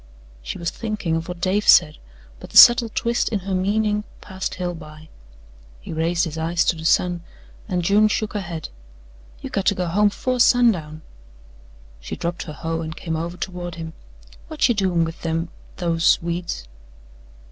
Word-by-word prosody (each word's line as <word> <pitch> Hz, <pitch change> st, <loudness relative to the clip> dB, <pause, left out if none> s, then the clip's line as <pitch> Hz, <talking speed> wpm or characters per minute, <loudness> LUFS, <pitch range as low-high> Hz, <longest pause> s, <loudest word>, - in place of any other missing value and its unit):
She 60 Hz, -, -6 dB
was 170 Hz, -1 st, -3 dB
thinking 215 Hz, -7 st, -3 dB
of 165 Hz, +1 st, -3 dB
what 180 Hz, -1 st, -6 dB
Dave 195 Hz, +4 st, 0 dB
said, 155 Hz, -3 st, +6 dB, 0.4 s
but -, -, -11 dB
the -, -, 0 dB
subtle 240 Hz, -1 st, +9 dB
twist 235 Hz, +2 st, -1 dB
in 210 Hz, -3 st, -2 dB
her 190 Hz, +1 st, -4 dB
meaning 210 Hz, +3 st, 0 dB, 0.2 s
passed 190 Hz, -1 st, -5 dB
Hale 180 Hz, -1 st, -3 dB
by. 155 Hz, -1 st, -12 dB, 0.7 s
He -, -, -8 dB
raised 165 Hz, +2 st, 0 dB
his 160 Hz, -1 st, -5 dB
eyes 170 Hz, +2 st, 0 dB
to -, -, +2 dB
the 160 Hz, 0 st, -8 dB
sun 175 Hz, +1 st, +2 dB, 0.5 s
and 180 Hz, -4 st, -1 dB
June 205 Hz, +4 st, +4 dB
shook 215 Hz, 0 st, -2 dB
her 205 Hz, -, -2 dB
head. 170 Hz, -3 st, -6 dB, 0.7 s
"You -, -, -7 dB
got 195 Hz, -, -1 dB
to 200 Hz, -, +4 dB
go 180 Hz, -, -2 dB
home 205 Hz, +5 st, +3 dB
'fore 255 Hz, +4 st, -2 dB
sundown." 185 Hz, -12 st, +3 dB, 1.0 s
She -, -, -6 dB
dropped 170 Hz, +1 st, -4 dB
her -, -, -6 dB
hoe 165 Hz, +2 st, -3 dB
and 160 Hz, 0 st, -6 dB
came 165 Hz, -2 st, -4 dB
over 170 Hz, +2 st, -4 dB
toward 175 Hz, -2 st, -5 dB
him. 160 Hz, -1 st, -7 dB, 0.6 s
"Whut 315 Hz, -1 st, +2 dB
you 240 Hz, -, +2 dB
doin' 185 Hz, -5 st, +1 dB
with 165 Hz, 0 st, -8 dB
them 165 Hz, 0 st, -2 dB, 0.3 s
those 165 Hz, -2 st, +2 dB
weeds?" 170 Hz, -, -4 dB
175 Hz, 180 wpm, -22 LUFS, 165-205 Hz, 1.0 s, subtle